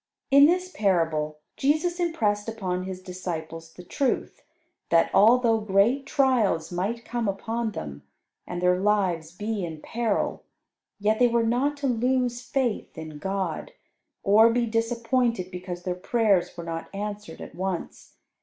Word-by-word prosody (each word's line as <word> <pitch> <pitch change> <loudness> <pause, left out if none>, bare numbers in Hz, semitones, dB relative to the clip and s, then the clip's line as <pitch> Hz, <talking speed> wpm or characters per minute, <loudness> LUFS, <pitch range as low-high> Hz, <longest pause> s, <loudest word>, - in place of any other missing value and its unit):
In 280 +1 +8
this 365 +2 +1
parable 165 - 0 0.2
Jesus 315 +6 +1
impressed 225 -12 0
upon 185 -5 -3
his 185 -1 -7
disciples 165 -3 -6
the 180 - -12
truth 265 +8 -2 0.5
that, 165 0 +3
although 230 +1 +5
great 215 +7 +2
trials 235 - +2
might 205 +7 -2
come 235 -2 -2
upon 225 +3 -2
them, 70 -2 -6 0.5
and 175 0 -4
their 180 0 +3
lives 185 -6 +1
be 205 +2 -3
in 160 -2 -5
peril, 225 +5 -1 0.6
yet 215 +2 +1
they 245 - +6
were 235 -1 +2
not 265 +6 +1
to 285 - -4
lose 245 0 +1
faith 250 - -2
in 155 -2 -8
God, 190 - -3 0.5
or 215 +3 +6
be 240 0 +1
disappointed 230 -2 0
because 180 -1 -6
their 180 - -1
prayers 195 -1 +1
were 170 - -5
not 165 0 -5
answered 210 +1 -5
at - - -9
once. 185 -1 -5
210 Hz, 145 wpm, -26 LUFS, 180-240 Hz, 0.6 s, In